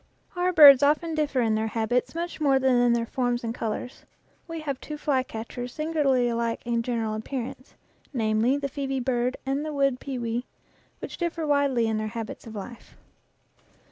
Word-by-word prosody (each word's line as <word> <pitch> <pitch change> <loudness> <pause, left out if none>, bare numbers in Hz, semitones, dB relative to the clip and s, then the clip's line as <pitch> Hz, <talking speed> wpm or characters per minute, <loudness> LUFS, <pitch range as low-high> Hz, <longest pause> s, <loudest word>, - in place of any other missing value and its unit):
Our 355 +1 +1
birds 285 -6 +9
often 305 +3 +2
differ 295 -4 0
in 225 -2 +2
their 220 +1 0
habits 230 +6 -1
much 340 -1 -4
more 275 -3 +4
than 265 -1 +2
in 245 -1 +4
their 235 -1 0
forms 245 0 -1
and 230 0 -2
colors. 230 +2 -5 0.4
We 330 -1 -5
have 280 -4 -3
two 300 - -6
fly 285 -3 +1
catchers 245 0 -7
singularly 295 -6 +1
alike 235 -1 -1
in 235 -1 0
general 230 -2 -2
appearance 250 +3 -6 0.4
namely, 225 +1 +1
the 280 -1 -2
phosbe 270 -2 -3
bird 250 -1 0
and 270 +2 -1
the 310 - -4
wood 275 -3 +1
pewee 245 -3 -3 0.5
which - - -8
differ 335 -2 -2
widely 280 -5 +2
in 220 -1 0
their 215 - -2
habits 225 0 -6
of 220 - -9
life. 225 +4 -9
255 Hz, 175 wpm, -26 LUFS, 235-285 Hz, 0.5 s, birds